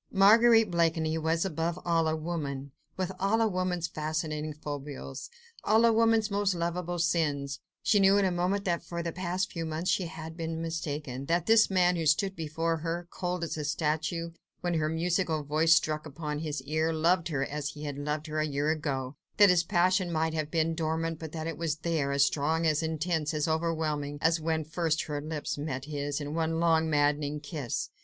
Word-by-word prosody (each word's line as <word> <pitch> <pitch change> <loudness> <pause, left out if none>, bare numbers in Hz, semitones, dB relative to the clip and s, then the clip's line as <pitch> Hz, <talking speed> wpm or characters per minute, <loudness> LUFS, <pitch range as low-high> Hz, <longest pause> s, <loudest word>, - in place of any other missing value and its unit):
Marguerite 225 +2 +6
Blakeney 165 -2 +1
was, 165 +2 +1
above 165 -1 -2
all, 165 -2 +2
a 160 - +1
woman, 145 -4 -4 0.3
with 185 0 -1
all 200 +4 +2
a 225 - +4
woman's 180 -3 -1
fascinating 155 0 -3
foibles, 145 -2 -7 0.3
all 220 +2 +4
a 230 - +5
woman's 225 -1 +3
most 200 -2 +1
lovable 175 +1 -2
sins. 150 -4 0 0.2
She 210 -1 +4
knew 195 0 +5
in 200 - +3
a 185 - +2
moment 185 +3 0
that 170 -2 0
for 170 0 -5
the 170 - -2
past 185 +2 -2
few 165 -3 -4
months 160 +2 -1
she 180 - 0
had 160 0 -8
been 165 -1 -4
mistaken: 145 -5 -4
that 170 0 +1
this 220 0 +5
man 180 -2 +3
who 165 -2 0
stood 190 +6 +3
here 160 -1 -4
before 165 +2 -1
her, 165 +2 -3
cold 180 -1 -3
as 165 - -3
a 150 - -3
statue, 155 +3 -1 0.3
when 175 -1 -1
her 155 -2 +1
musical 165 -1 0
voice 155 +3 +4
struck 155 0 0
upon 150 0 -4
his 150 -3 -4
ear, 155 +3 0
loved 165 +2 +2
her, 140 -5 -1
as 145 0 -3
he 150 0 -9
had 145 -1 -4
loved 150 +1 -2
her 155 -1 -3
a 155 - +1
year 145 +1 0
ago: 140 -4 -3 0.2
that 205 -3 +8
his 175 -1 +3
passion 180 0 +2
might 160 0 0
have 155 -2 -2
been 165 0 +1
dormant, 160 0 -2
but 160 -2 -7
that 160 -1 -5
it 165 -2 -4
was 165 -3 0
there, 160 -3 -1
as 140 0 +4
strong, 160 +3 0
as 155 -1 +2
intense, 160 -1 -1
as 150 +1 0
overwhelming, 160 -3 -1
as 165 +1 +2
when 160 0 0
first 160 0 0
her 145 -1 -4
lips 150 -1 -4
met 135 -3 -4
his 145 -1 -3
in 145 0 -5
one 165 0 0
long, 160 -1 +3
maddening 145 0 +1
kiss. 145 -6 -4
160 Hz, 200 wpm, -29 LUFS, 150-175 Hz, 0.3 s, that